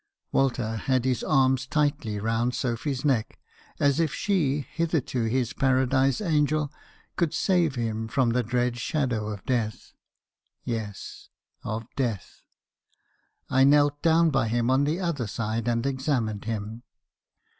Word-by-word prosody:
Walter 120 -4 0
had 130 +2 0
his 130 -2 0
arms 130 -3 +2
tight 145 +1 +1
round 115 +3 -1
Sophy's 130 +3 -2
neck, 130 -7 0 0.4
as 140 +1 +3
if 160 -3 +1
she, 150 -8 0
hitherto 150 -7 -1
his 120 +1 0
paradise 130 0 +2
angel, 150 -5 +1 0.5
could 170 -4 0
save 175 -7 +2
him 115 -2 -2
from 125 0 +1
the 125 +2 +2
dread 120 +1 -1
shadow 120 -5 -1
of 105 -3 -6
Death. 115 -4 -2 0.7
Yes! 110 -4 -6 0.3
of 115 0 -4
Death! 120 -8 -3 1.1
I 130 +1 +3
knelt 145 +1 +4
down 165 0 +4
by 125 -5 +1
him 120 +2 +1
on 135 +2 +3
the 155 +5 0
other 165 - -2
side, 110 +2 -3
and 115 +1 0
examined 130 -6 -1
him. 110 +1 -4
130 Hz, 135 wpm, -26 LUFS, 115-145 Hz, 1.1 s, knelt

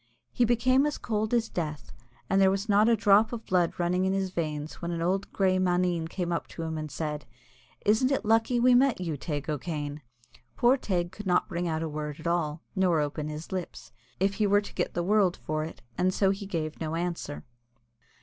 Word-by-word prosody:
He 245 - +2
became 255 +4 +3
as 295 - -2
cold 215 -1 -2
as 235 -2 +2
the - - -23
Death, 155 -4 -4 0.3
and 195 0 +3
there 190 - +6
was 195 +2 -1
not 210 +2 +4
a 230 - +5
drop 210 0 +4
of 230 -2 -6
blood 180 -2 +2
running 180 +1 +1
in 190 - +1
his 190 -1 -1
veins 155 -3 -4
when 170 - -3
an 170 -1 -2
old 185 +4 0
little - - -24
grey 185 -1 +3
maneen 180 -2 +1
came 175 +1 -3
up 170 - -2
to 165 - -7
him 160 0 -3
and 155 -1 -4
said, 150 +1 -4 0.6
"Isn't 220 +6 +3
it 275 - 0
lucky 225 +3 +3
we 250 +1 +5
met 255 -2 +4
you, 170 -4 -2
Teig 145 0 -4
O'Kane?" 150 -1 -3 0.5
Poor 245 +2 +4
Teig 180 -9 -2
could 210 0 -8
not 180 - +2
bring 175 -2 -2
out 160 -1 -1
a - - -2
word 150 -1 -5
at 160 - -11
all, 165 -2 -1
nor 185 -4 +3
open 150 +1 -2
his 155 +1 -7
lips, 185 -2 -5 0.3
if 195 +2 +2
he 210 +1 +1
were 205 +1 +4
to 205 - -10
get 175 - -2
the 175 - 0
world 195 -1 +3
for 155 0 -3
it, 160 - -8 0.2
and 185 +1 +3
so 195 -1 +3
he 195 0 -5
gave 160 -5 -3
no 160 0 -2
answer. 170 - -4
180 Hz, 225 wpm, -28 LUFS, 160-205 Hz, 0.6 s, there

